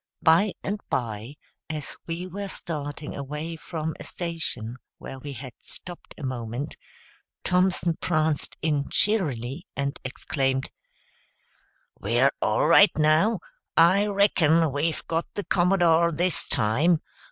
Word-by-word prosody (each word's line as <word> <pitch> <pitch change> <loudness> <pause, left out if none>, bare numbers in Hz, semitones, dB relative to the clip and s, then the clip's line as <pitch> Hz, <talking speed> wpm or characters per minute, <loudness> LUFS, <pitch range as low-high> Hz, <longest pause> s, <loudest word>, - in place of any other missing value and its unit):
By 175 +5 +5
and 205 +2 -2
by, 115 +2 -3 0.3
as 155 -2 -5
we 170 +2 -3
were 200 +2 -5
starting 150 -5 -5
away 150 +4 -5
from 160 -1 -4
a - - -7
station 160 -9 -4 0.2
where 135 - -8
we 140 +1 -7
had 130 0 -8
stopped 175 -1 -11
a 155 - -9
moment, 130 +2 -4 0.7
Thompson 180 -2 +2
pranced 155 -3 0
in 150 -3 0
cheerily 150 - 0
and 140 0 -2
exclaimed, 135 0 -1 1.3
"We're 120 +6 +3
all 105 - +2
right, 180 +6 +8
now! 160 +7 +3 0.4
I 185 +5 +6
reckon 170 -6 +3
we've 155 +4 -1
got 165 +1 -2
the 205 - -2
Commodore 175 -3 +3
this 175 +1 +1
time. 140 +9 +3
155 Hz, 120 wpm, -26 LUFS, 140-175 Hz, 1.3 s, right